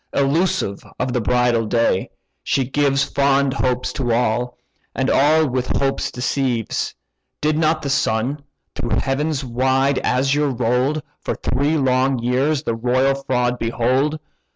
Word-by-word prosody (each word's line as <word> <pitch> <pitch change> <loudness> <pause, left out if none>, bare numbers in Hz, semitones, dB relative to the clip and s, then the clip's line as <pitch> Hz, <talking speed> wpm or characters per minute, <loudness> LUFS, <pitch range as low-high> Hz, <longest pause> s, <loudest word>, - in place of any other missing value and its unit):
Elusive 140 - 0
of 125 0 -2
the 125 - 0
bridal 120 0 +1
day, 115 -5 +1 0.3
she 135 -3 0
gives 140 0 +1
Fond 140 -1 +1
hopes 125 -2 -1
to 125 -4 -2
all, 120 +1 0 0.4
and 130 0 0
all 155 +2 +4
with 130 -1 -1
hopes 135 -1 0
deceives. 125 -2 -2 0.4
Did 150 0 +1
not 155 0 +1
the 140 - -2
sun, 135 +1 0 0.3
through 120 - -2
heaven's 145 +1 -1
wide 130 +2 +1
azure 140 +3 +1
roll'd, 125 +4 0 0.2
For - - -3
three 150 +3 0
long 130 -1 +2
years 130 +5 0
the 115 - -1
royal 125 +4 +1
fraud 125 -3 -1
behold? 130 +6 0
130 Hz, 135 wpm, -20 LUFS, 125-140 Hz, 0.4 s, all